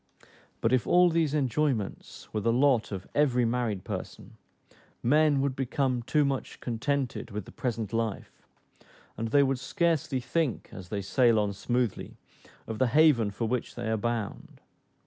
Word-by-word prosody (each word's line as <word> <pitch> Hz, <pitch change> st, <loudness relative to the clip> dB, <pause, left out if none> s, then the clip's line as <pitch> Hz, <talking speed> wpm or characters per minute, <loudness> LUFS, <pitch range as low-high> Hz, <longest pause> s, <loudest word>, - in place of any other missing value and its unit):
But 115 Hz, -, +2 dB
if 130 Hz, -, +2 dB
all 180 Hz, 0 st, +5 dB
these 160 Hz, -3 st, +1 dB
enjoyments 135 Hz, -5 st, -1 dB
were 110 Hz, -, 0 dB
the 115 Hz, -, +2 dB
lot 125 Hz, -2 st, +2 dB
of 95 Hz, -1 st, -5 dB
every 125 Hz, -5 st, +3 dB
married 115 Hz, -5 st, -1 dB
person, -, -, -7 dB, 0.7 s
men 145 Hz, +2 st, +4 dB
would 140 Hz, -1 st, -1 dB
become 130 Hz, -1 st, 0 dB
too 145 Hz, +5 st, +2 dB
much 135 Hz, -1 st, -3 dB
contented 130 Hz, +2 st, -2 dB
with 105 Hz, -2 st, -5 dB
the -, -, -12 dB
present 115 Hz, -4 st, -3 dB
life, 115 Hz, -2 st, -2 dB, 0.8 s
and 115 Hz, -, -3 dB
they 140 Hz, +5 st, +4 dB
would 135 Hz, -2 st, 0 dB
scarcely 155 Hz, -1 st, 0 dB
think, 140 Hz, 0 st, -2 dB
as 90 Hz, -2 st, -10 dB
they 100 Hz, -2 st, -3 dB
sail 120 Hz, +2 st, +3 dB
on 105 Hz, -1 st, +1 dB
smoothly, 120 Hz, +2 st, -2 dB, 0.5 s
of 110 Hz, -1 st, -5 dB
the 130 Hz, -, +3 dB
haven, 145 Hz, -5 st, +4 dB
for 100 Hz, +3 st, -3 dB
which 125 Hz, +1 st, -2 dB
they 120 Hz, -2 st, -3 dB
are -, -, +2 dB
bound. 115 Hz, -1 st, -4 dB
125 Hz, 160 wpm, -28 LUFS, 110-140 Hz, 0.8 s, all